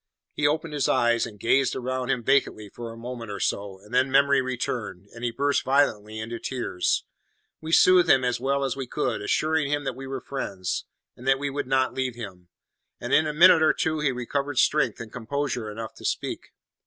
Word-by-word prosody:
He 145 - +1
opened 155 +1 -1
his 145 -3 0
eyes, 120 -1 +2
and 105 -2 -13
gazed 130 +5 +2
round 130 0 -3
him 125 -3 0
vacantly 110 -5 +1
for 115 +3 -8
a 115 - -11
moment 120 -1 -7
or 100 - -5
so, 100 -1 -2
and 105 +4 -16
then 130 +2 +3
memory 140 +1 +4
returned, 120 -7 -4
and 115 +1 -10
he 120 - +1
burst 140 +5 0
violently 110 -6 +1
into 115 +2 -5
tears. 120 -8 -1 0.6
We 160 0 -6
soothed 180 0 +6
him 130 -1 +5
as 125 -1 0
well 140 +2 0
as 135 -1 -1
we 135 -2 -5
could, 150 - -2
assuring 155 -2 +1
him 145 0 0
that 135 - -2
we 135 +1 -8
were 135 0 -4
friends, 100 -9 -4 0.3
and 125 - -11
that 135 0 +4
we 140 0 -3
would 140 -1 -3
not 130 -1 +1
leave 130 -2 -2
him; 95 -7 -9 0.5
and - - -4
in 155 +1 +4
a - - -1
minute 170 +1 +7
or 155 - +5
two 155 -1 -1
he 150 -2 +1
recovered 140 +3 -3
strength 135 -5 +2
and 110 -1 -9
composure 125 -1 -3
enough 110 +1 -7
to - - -10
speak. - - -3
130 Hz, 210 wpm, -25 LUFS, 115-140 Hz, 0.6 s, minute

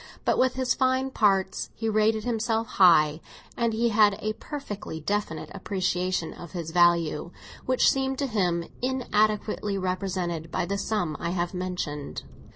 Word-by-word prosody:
But - - +2
with 255 0 +3
his 260 -1 +1
fine 260 0 +1
parts 195 -5 +1
he 225 - -3
rated 215 0 +2
himself 225 -1 0
high, 165 -8 +4 0.3
and 235 -1 +1
he 230 +2 +1
had 210 -2 +4
a 215 0 -2
perfectly 215 - -6
definite 200 -1 -3
appreciation 185 -3 -1
of 175 0 -11
his 170 -3 -4
value, 170 -2 +3 0.4
which 255 0 +4
seemed 265 0 -1
to 280 - 0
him 180 -8 0 0.2
inadequately 215 -5 0
represented 180 -3 -2
by - - -1
the 200 +2 -2
sum 195 -8 -1
I 170 - -2
have 175 0 -2
mentioned. 180 -6 -4
200 Hz, 150 wpm, -26 LUFS, 175-225 Hz, 0.4 s, high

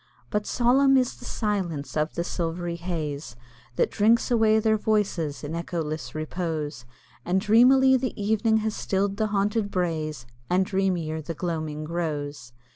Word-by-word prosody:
But 210 0 -1
solemn 265 +3 +4
is 255 -1 +1
the - - -12
silence 175 - -2
of 155 0 -1
the 170 - -1
silvery 170 0 -3
haze 155 -7 -4 0.4
That - - +1
drinks 225 +3 +3
away 220 -2 +4
their 220 0 +3
voices 200 -10 0
in 150 +2 -5
echoless 155 -6 -4
repose, 155 -4 -3 0.4
And 185 +2 +1
dreamily 255 +6 +5
the 255 -3 -4
evening 220 +2 +2
has 220 - -1
still'd 195 +1 -1
the 220 0 +1
haunted 205 +1 0
braes, 155 -8 -2 0.2
And 185 +1 +3
dreamier 180 -5 -1
the 165 +2 -6
gloaming 155 -3 -3
grows. 150 -5 -4
180 Hz, 145 wpm, -26 LUFS, 155-215 Hz, 0.4 s, dreamily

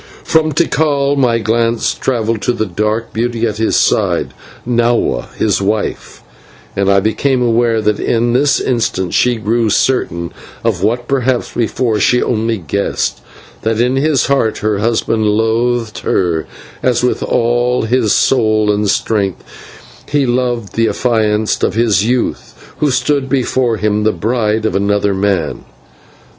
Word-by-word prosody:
From 155 -1 +2
Tikal 145 -2 +1
my 125 -4 +2
glance 115 +1 0
travelled 115 -4 -1
to 125 - 0
the 110 -2 -2
dark 105 +4 -2
beauty 115 0 -1
at 110 -2 -2
his 110 0 0
side, - - +1 0.3
Nahua, 120 - 0
his 105 -2 +1
wife, 105 +2 -3 0.5
and 100 0 +1
became 125 +4 +1
aware 115 -1 +1
that 105 0 +1
in 120 0 0
this 140 +3 +2
instant 110 -7 -1
she 125 -1 +2
grew 115 +1 0
certain 85 -8 0 0.3
of 110 -6 0
what 120 +4 0
perhaps 130 -2 0
before 115 -1 0
she 125 +5 +3
only 115 -1 -1
guessed, 95 +3 -2 0.4
that 110 0 -1
in 125 +2 +2
his 140 -1 +2
heart 135 -6 +1
her 105 -1 -1
husband 110 0 0
loathed 115 +2 0
her, 80 -6 -1 0.3
as 125 -1 +1
with 125 - 0
all 120 +1 +1
his 115 -1 +1
soul 110 -4 +2
and 105 0 0
strength 100 -3 -1 0.7
he 145 -1 +1
loved 120 -3 -1
the 115 0 +1
affianced 110 -3 0
of 95 - 0
his 110 -4 +2
youth 120 +2 -3
who 150 - +2
stood 135 +1 0
before 125 -3 0
him 105 0 0
the 110 +1 +2
bride 110 +3 -1
of 105 - -1
another 100 0 +1
man. 95 -2 -1
115 Hz, 145 wpm, -15 LUFS, 105-125 Hz, 0.7 s, she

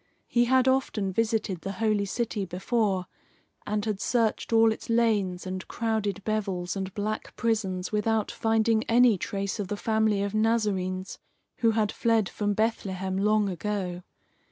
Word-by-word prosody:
He 240 0 +2
had 260 +1 +3
often 235 -7 +1
visited 220 -4 0
the 195 - -4
holy 215 0 +1
city 215 0 -2
before, 190 +1 0 0.6
and 210 0 -1
had 210 -3 -2
searched 230 +1 0
all 225 0 +5
its 220 - -6
lanes 210 -6 +1
and 185 0 -5
crowded 215 -3 -2
bevels 195 -5 -2
and 190 -1 -3
black 215 +1 -3
prisons 195 -5 -1
without 215 0 0
finding 225 0 +2
any 240 -1 +5
trace 200 +3 -3
of 200 - -2
the 205 +1 -3
family 220 -2 +1
of 200 0 -3
Nazarenes 205 -4 0 0.4
who 230 -2 +3
had 210 -2 +2
fled 225 -4 +2
from 205 -1 -1
Bethlehem 190 -4 -1
long 210 +1 +2
ago. 185 -1 -3
210 Hz, 150 wpm, -27 LUFS, 195-225 Hz, 0.6 s, all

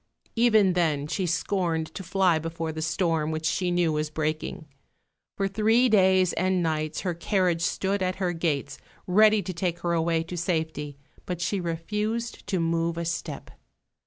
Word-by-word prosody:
Even 220 -5 +4
then 155 -5 +1
she 180 +4 -2
scorned 165 -1 -1
to - - -6
fly 185 -2 +2
before 165 0 -4
the 160 0 -5
storm 160 -1 0
which 160 0 -3
she 180 +3 0
knew 175 -2 +2
was 150 0 -1
breaking. 155 +1 -3 0.7
For 195 - +1
three 220 +5 +3
days 190 -4 +4
and 185 -1 +1
nights 155 -1 -1
her 180 -3 -1
carriage 175 -1 0
stood 190 +3 0
at 185 0 0
her 180 -2 -1
gates 160 -5 -2 0.3
ready 210 +2 +5
to 185 - -4
take 175 0 -2
her 170 -1 0
away 165 0 +1
to 175 +2 -7
safety; 160 -4 -2 0.3
but 180 -2 -3
she 195 +3 -1
refused 210 +8 -3
to 190 -3 0
move 165 0 0
a 170 - -2
step. 170 - -4
175 Hz, 165 wpm, -26 LUFS, 160-190 Hz, 0.7 s, ready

